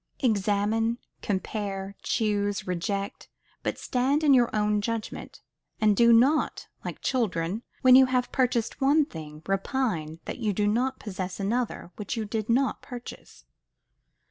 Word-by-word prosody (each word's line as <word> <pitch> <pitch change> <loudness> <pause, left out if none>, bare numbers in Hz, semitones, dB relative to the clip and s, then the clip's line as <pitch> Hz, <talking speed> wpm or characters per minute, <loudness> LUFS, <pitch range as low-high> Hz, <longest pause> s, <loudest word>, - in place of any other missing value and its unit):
Examine, 220 0 +1 0.2
compare, 195 -1 -3
choose, 205 -2 0
reject; 195 +3 -3 0.3
but - - -2
stand 265 +4 +1
to 295 -3 +5
your 245 -3 +5
own 210 0 +1
judgment: 225 0 -5 0.4
and 215 -1 +4
do 235 +3 +6
not, 260 +7 +3 0.2
like - - -6
children, 200 -5 0 0.2
when 255 -1 +8
you 265 0 +8
have 250 -1 0
purchased 245 -2 0
one 290 +3 +4
thing, 155 - -9
repine 195 - -1
that - - -5
you 215 -4 0
do 205 +2 0
not 250 +5 +1
possess 185 -3 -5
another 215 -2 -2
which 210 +3 -4
you 220 - -1
did 215 +1 -3
not 260 +3 +2
purchase. 240 - -10
215 Hz, 140 wpm, -27 LUFS, 200-250 Hz, 0.4 s, when